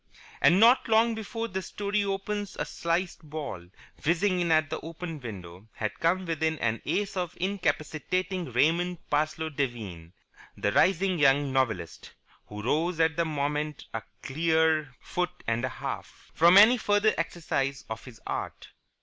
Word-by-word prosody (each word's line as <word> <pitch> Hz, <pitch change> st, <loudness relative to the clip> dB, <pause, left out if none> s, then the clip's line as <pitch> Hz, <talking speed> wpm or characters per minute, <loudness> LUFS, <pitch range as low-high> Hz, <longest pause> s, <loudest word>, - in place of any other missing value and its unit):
And 155 Hz, +8 st, +6 dB
not 235 Hz, +4 st, +6 dB
long 225 Hz, +1 st, +4 dB
before 225 Hz, +1 st, -4 dB
this 190 Hz, -2 st, -4 dB
story 205 Hz, 0 st, -1 dB
opens 200 Hz, +1 st, -3 dB
a -, -, -1 dB
sliced 170 Hz, +2 st, -2 dB
ball, 140 Hz, -, -6 dB, 0.4 s
whizzing 180 Hz, +4 st, +2 dB
in 170 Hz, -2 st, +1 dB
at 155 Hz, -2 st, +3 dB
the 160 Hz, -, -2 dB
open 165 Hz, 0 st, -7 dB
window, 95 Hz, -5 st, -9 dB
had 105 Hz, -1 st, -4 dB
come 185 Hz, +3 st, +1 dB
within 160 Hz, -1 st, -1 dB
an 115 Hz, -3 st, -1 dB
ace 205 Hz, -1 st, -1 dB
of 180 Hz, -3 st, -3 dB
incapacitating 180 Hz, -1 st, -1 dB
Raymond 170 Hz, +8 st, +2 dB
Parsloe 155 Hz, +2 st, 0 dB
Devine, 110 Hz, -, -4 dB, 0.4 s
the 105 Hz, -, 0 dB
rising 185 Hz, -, +3 dB
young 140 Hz, -1 st, +4 dB
novelist 110 Hz, -, -2 dB, 0.3 s
(who 105 Hz, 0 st, -7 dB
rose 160 Hz, +7 st, 0 dB
at 160 Hz, 0 st, +3 dB
that 170 Hz, 0 st, +1 dB
moment 150 Hz, 0 st, -2 dB
a 115 Hz, -, -2 dB, 0.2 s
clear 160 Hz, 0 st, +2 dB
foot 180 Hz, 0 st, -4 dB
and 115 Hz, +1 st, 0 dB
a 130 Hz, -, 0 dB
half) 115 Hz, -8 st, -7 dB
from 170 Hz, +3 st, +6 dB
any 220 Hz, +5 st, +8 dB
further 205 Hz, -1 st, +2 dB
exercise 150 Hz, -5 st, -2 dB
of 110 Hz, 0 st, -6 dB
his 125 Hz, -3 st, -12 dB
art. -, -, -5 dB
160 Hz, 150 wpm, -28 LUFS, 135-185 Hz, 0.4 s, any